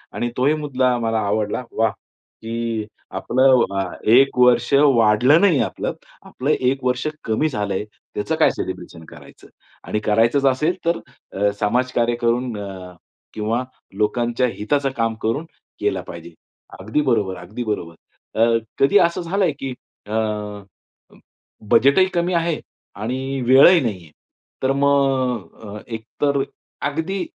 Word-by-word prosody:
आणि 120 - -1
तोही 140 +4 +3
मुद्दा 130 -4 0
मला 115 -1 0
आवडला, 105 +3 -1
वाह! 110 -1 +1 0.5
की 115 -1 -3 0.3
आपलं 130 0 +4 0.2
अ, - - +1 0.3
एक 135 +1 +5
वर्ष 125 +1 +4
वाढलं 130 - +5
नाही 180 -9 +4
आपलं. - - -3 0.3
आपलं 135 +4 -4
एक 130 -1 0
वर्ष 125 +2 0 0.2
कमी 130 +8 0
झालंय, 105 -5 -2 0.3
त्याचं - - -1
काय - - +4
सेलिब्रेशन 80 - -7
करायचं? - - -15 0.4
आणि 105 - -1
करायचंच 115 +6 +2
असेल 145 +6 +2
तर 170 0 +1 0.3
अ, 100 +1 +1
समाजकार्य 120 +2 +1
करून 120 0 0
अ, 95 -3 -8 0.4
किंवा 110 +3 -1 0.3
लोकांच्या 120 +3 +1
हिताचं 140 +6 0
काम 115 0 +1
करून 125 +9 -1 0.3
केलं - - 0
पाहिजे. 85 0 -9 0.5
अगदी 110 +10 -1
बरोबर, 110 -9 0
अगदी 95 +8 -6
बरोबर. 105 -7 -3 0.5
अ, 115 0 +4 0.2
कधी 140 +9 +5
असं 170 +2 -5
झालंय 180 0 0
की 135 -2 -4 0.3
अ, 105 - -6 1.6
बजेटही 140 +8 +5
कमी 175 +1 0
आहे 170 -1 0 0.4
आणि 130 +4 -3
वेळही 140 +7 +7
नाही 105 -8 -3
आहे. 80 - -18 0.5
तर 130 - +3
मग 135 -7 +1
अ, 105 0 -8
एक 110 -1 -6 0.2
तर 140 -1 +2 0.5
अगदी 160 +6 -3
125 Hz, 135 wpm, -21 LUFS, 110-140 Hz, 1.6 s, वेळही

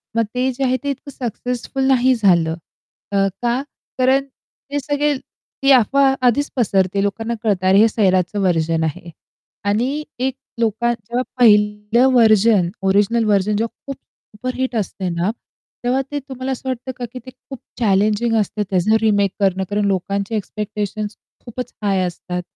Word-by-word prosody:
मग 230 - +3
ते 255 +1 +1
जे 260 +2 -4
आहे 255 0 +2
ते 285 - -2
इतकं 280 +1 -5
सक्सेसफुल 250 +1 -4
नाही 260 -1 +4
झालं. 175 -7 +3 0.6
अ, - - -2 0.3
का? 240 +2 +1 0.4
कारण 265 +2 +3
ते 280 +1 -8
सगळे 290 +1 0 0.5
ती 275 - +5
अफवा 270 +2 +4
आधीच 285 +5 +2
पसरते 195 -5 +1
लोकांना 225 +3 -2
कळतं, 195 -4 +1
अरे 190 +1 +5
हे 220 - +7
सैराचं 190 -3 +1
व्हर्जन 165 -3 +1
आहे. 160 +2 -4 0.6
आणि 250 +9 0 0.2
एक 265 - -3 0.2
लोका 235 +1 +1
जेव्हा 235 +2 -3 0.2
पहिलं 210 +1 +4
व्हर्जन, 215 -5 +4
ओरिजिनल 205 +4 +2
व्हर्जन 205 0 +2
जेव्हा 230 +1 -2
खूप 275 - -4
सुपरहिट 255 +2 -6
असते 195 -3 -2
ना, 170 +3 -1 0.5
तेव्हा 255 +2 +1
ते 290 - -2
तुम्हाला 265 -1 -6
असं 260 0 -4
वाटतं 255 +1 -4
का 245 - -4
की 255 - -6
ते - - -8
खूप 270 0 -12 0.2
चॅलेंजिंग 215 +2 +2
असतं 210 +1 -3
त्याचं 190 +3 +2
रिमेक 205 -3 +2
करणं 190 -1 +1
कारण 205 0 0
लोकांचे 200 +2 -1
एक्स्पेक्टेशन्स 210 0 -4 0.3
खूपच 245 +1 -6
हाय 195 -2 +1
असतात. 180 0 -4
220 Hz, 155 wpm, -19 LUFS, 200-255 Hz, 0.6 s, हे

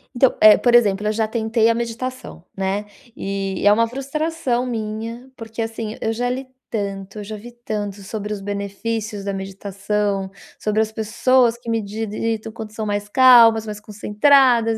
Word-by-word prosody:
Então, 250 +1 +4
eh, 215 0 +9
por 240 -1 +3
exemplo, 210 -3 +3
eu - - +2
já 220 0 0
tentei 220 0 +1
a - - +4
meditação, 235 -3 -5
né, 195 +2 -2 0.3
e 195 -1 -3
é 205 - +7
uma 230 +2 +2
frustração 275 0 -2
minha, 230 +1 -5
porque, 225 -1 -10
assim, 225 -1 -4
eu 225 - -1
já 245 +2 -1
li 260 +1 -4 0.2
tanto, 200 -1 -4
eu - - -5
já 215 +2 -7
vi 225 +4 -10
tanto 210 -4 -5
sobre 210 +1 -5
os 210 - -3
benefícios 205 +1 -4
da 200 0 -3
meditação, 195 +1 -3 0.3
sobre 215 0 +1
as 220 0 -1
pessoas 235 +2 +2
que 240 0 -18
meditam 220 0 -3
quando 220 -1 -8
são 220 0 -4
mais 205 0 -2
calmas, 230 -2 +7
mais 210 -1 -6
concentradas, 225 +2 +3
220 Hz, 165 wpm, -21 LUFS, 205-235 Hz, 0.3 s, eh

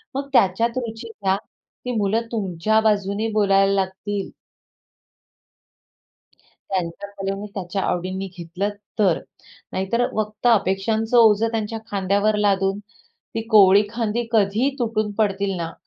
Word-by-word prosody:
मग 275 +1 -3
त्याच्यात 230 +3 +3
रुची 230 -2 -5
घ्या, 195 -3 0
"ती 250 - -11
मुलं 210 +3 +1
तुमच्या 215 0 +1
बाजूने 205 0 +1
बोलायला 195 -1 +3
लागतील." 195 +1 -2 2.4
त्यांच्या 185 +1 -3
कलेने, 195 +1 -3
त्यांच्या 195 0 -3
आवडींनी 185 +2 -2
घेतलं 175 +4 -3 0.3
तर. 185 -6 +3 0.5
नाहीतर 235 +6 0
फक्त 215 +2 -2
अपेक्षांचं 220 +1 +2
ओझं 220 0 +5
त्यांच्या 225 0 -2
खांद्यावर 200 +2 +1
लादून, 195 -1 +1 0.6
ती 225 - -1
कोवळी 200 -2 +7
खांदी 230 0 -2
कधीही 220 +5 +2
तुटून 220 -3 -1
पडतील 200 -2 0
ना, 165 -1 -4
205 Hz, 115 wpm, -22 LUFS, 195-220 Hz, 2.4 s, कोवळी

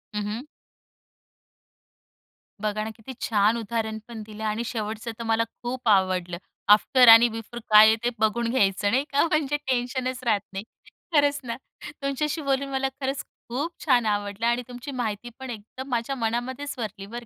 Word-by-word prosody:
हं, 210 - -1
हं. 215 +5 -4 2.2
बघा 215 0 -1
ना, 220 - -4
किती 225 +4 -10
छान 215 +1 +2
उदाहरण 220 0 -2
पण 230 -2 -7
दिलं 215 0 -9
आणि 215 +2 -1
शेवटचं 220 0 -4
तर 230 - -3
मला 225 0 +2 0.2
खूप 245 0 -4
आवडलं. 185 -3 +2 0.3
आफ्टर 245 +4 +6
आणि 230 +1 +10
बिफोर 225 +2 -7
काय 215 0 +9
आहे 220 - +5
ते 240 - +2
बघून 230 +2 +1
घ्यायचं 205 -4 +2
नाही 265 +3 +2
का 285 +2 +3
म्हणजे 295 -2 +1
टेन्शनच 255 0 -1
राहत 215 -4 +2
नाही. 195 +2 -4 0.5
खरंच 285 -1 +4
ना. 235 -1 -4 0.5
तुमच्याशी 295 +3 -1
बोलून 275 0 0
मला 270 0 0
खरंच 270 +1 -2 0.3
खूप 285 +8 -2
छान 250 -5 +4
आवडलं 205 +1 -1
आणि 240 +1 +2
तुमची 245 +3 -8
माहिती 220 +1 -3
पण 265 -1 -7
एकदम 240 +4 -8
माझ्या 245 +2 -1
मनामध्येच 245 +4 -2
भरली 210 -4 -5
बरं 235 +3 -8
235 Hz, 165 wpm, -25 LUFS, 215-260 Hz, 2.2 s, आणि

